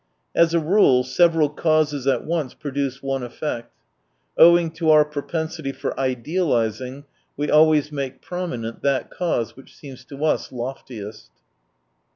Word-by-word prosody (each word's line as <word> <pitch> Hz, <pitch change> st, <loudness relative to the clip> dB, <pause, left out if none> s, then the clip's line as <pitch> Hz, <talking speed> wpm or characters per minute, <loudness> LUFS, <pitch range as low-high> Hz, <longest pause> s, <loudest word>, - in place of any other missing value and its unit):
As 170 Hz, 0 st, +3 dB
a -, -, +4 dB
rule, 155 Hz, -6 st, +4 dB
several 165 Hz, +3 st, +3 dB
causes 150 Hz, -2 st, 0 dB
at 135 Hz, -, +1 dB
once 160 Hz, -5 st, -2 dB
produce 140 Hz, -2 st, -4 dB
one 135 Hz, -1 st, -2 dB
effect. 120 Hz, -1 st, -5 dB, 0.6 s
Owing 170 Hz, 0 st, +6 dB
to 165 Hz, 0 st, -1 dB
our 155 Hz, -1 st, +6 dB
propensity 155 Hz, 0 st, -4 dB
for -, -, -4 dB
idealising, 130 Hz, -, -1 dB, 0.3 s
we 145 Hz, +1 st, -1 dB
always 150 Hz, -1 st, +4 dB
make 135 Hz, -3 st, -5 dB
prominent 125 Hz, -11 st, -5 dB
that 140 Hz, -1 st, 0 dB
cause 165 Hz, -10 st, -2 dB
which 135 Hz, -, -16 dB
seems 135 Hz, -4 st, -11 dB
to 145 Hz, +2 st, -5 dB
us 155 Hz, -, 0 dB
loftiest. 120 Hz, -4 st, -7 dB
145 Hz, 135 wpm, -22 LUFS, 130-160 Hz, 0.6 s, Owing